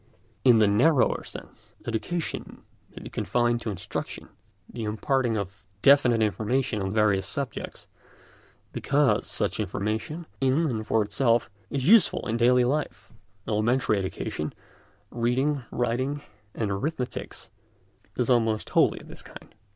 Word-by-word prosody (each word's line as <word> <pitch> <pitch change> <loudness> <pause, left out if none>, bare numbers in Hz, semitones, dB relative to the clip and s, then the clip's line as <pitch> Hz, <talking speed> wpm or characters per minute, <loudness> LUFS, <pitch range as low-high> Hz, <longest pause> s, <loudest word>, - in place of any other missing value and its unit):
In 125 -3 +6
the 110 -1 +5
narrower 125 +8 +3
sense, - - -12
education 120 +9 -4 0.3
may - - -11
be - - -8
confined 120 -1 0
to 115 - -3
instruction, 95 -4 -5 0.4
the 115 - -7
imparting 115 +2 0
of 100 -1 -6 0.2
definite 125 -5 +5
information 110 +2 0
on 95 0 -2
various 105 -2 +2
subjects, 140 -5 -5 0.9
because - - +1
such - - -1
information, 110 - -3
in 135 +5 +2
and 110 -7 -2
for 110 - +3
itself, 115 +1 +1 0.2
is 135 -2 -2
useful 215 -2 +5
in 115 - -1
daily 125 +1 +4
life. 125 -6 -3 0.3
Elementary 110 0 +1
education—reading, 120 - -3
writing, 130 +4 -1 0.3
and 105 -3 -1
arithmetic—is 125 +5 -4 0.8
almost 115 -3 +1
wholly - - +3
of - - -15
this - - -9
kind. - - -14
120 Hz, 120 wpm, -26 LUFS, 105-130 Hz, 0.9 s, In